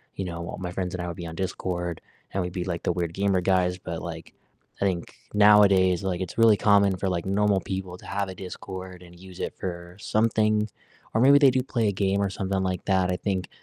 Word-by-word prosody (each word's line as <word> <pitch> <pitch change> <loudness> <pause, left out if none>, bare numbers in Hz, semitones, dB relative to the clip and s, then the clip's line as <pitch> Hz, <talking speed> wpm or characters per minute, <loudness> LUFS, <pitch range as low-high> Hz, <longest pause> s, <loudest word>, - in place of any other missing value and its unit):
you 95 - -3
know, 85 -1 -5
all - - -6
my 90 -1 -4
friends 90 -1 -3
and 90 - -4
I - - -4
would 85 - -6
be 85 - -6
on 80 - -7
Discord, 90 -2 -3 0.3
and 95 - -1
we'd 90 0 -5
be 90 - -2
like 85 -2 -3
the - - +1
weird 85 -1 -2
gamer 95 0 +1
guys, 90 -1 +2
but, 85 -2 -5
like, 80 -2 -7 0.5
I - - +2
think 90 -3 -2 0.2
nowadays, 100 -3 +5
like, 95 -2 -2
it's 95 - -5
really 115 -2 +6
common 100 -2 +4
for, 95 +1 -1
like, 85 -2 -2
normal 100 0 +2
people 95 -2 -5
to - - -16
have 100 0 -2
a 95 - -7
Discord, 95 0 -8
and 85 0 -15
use 95 -1 -12
it - - -3
for 85 -1 -6
something, 110 0 +1 0.4
or 110 - +2
maybe 140 +2 +7
they 140 -2 +7
do 130 0 +1
play 120 -4 0
a - - +1
game, 100 0 0
or 100 - +1
something 95 0 -2
like 95 -2 -2
that. 95 -2 +2
I 90 - -1
think 95 -2 -2
95 Hz, 240 wpm, -26 LUFS, 90-100 Hz, 0.5 s, maybe